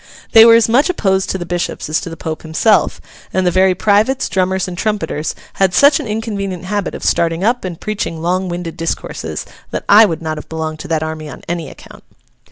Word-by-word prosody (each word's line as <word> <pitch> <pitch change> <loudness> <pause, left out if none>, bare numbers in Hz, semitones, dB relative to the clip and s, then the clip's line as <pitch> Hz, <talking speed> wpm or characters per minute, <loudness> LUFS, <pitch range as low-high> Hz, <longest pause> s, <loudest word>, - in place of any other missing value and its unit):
They 225 0 +9
were 230 0 +8
as 230 -1 +4
much 255 +9 +3
opposed 195 - 0
to - - -1
the 175 - -5
Bishops 175 0 -3
as 155 +1 0
to - - -6
the 165 - -8
Pope 155 0 -5
himself; 165 +7 +2 0.3
and 185 0 0
the 180 - +3
very 185 +1 +3
privates, 215 +7 +2
drummers, 190 0 0
and 180 - -6
trumpeters, 200 -6 -2 0.3
had 190 -2 +3
such 285 - +6
an 285 - -5
inconvenient 200 -4 -4
habit 205 0 -2
of - - -8
starting 165 +1 +1
up 240 +4 +1
and 180 -3 -5
preaching 200 -6 -3
long 180 +3 -1
winded 175 -1 -5
discourses, 165 +1 -4 0.2
that - - -5
I 210 +2 +8
would 165 -4 -3
not 155 -1 -3
have - - -12
belonged 160 -1 -4
to - - -7
that 160 -2 0
army 155 -1 -5
on 130 - -11
any 170 -3 -3
account. - - -14
185 Hz, 215 wpm, -16 LUFS, 165-210 Hz, 0.3 s, They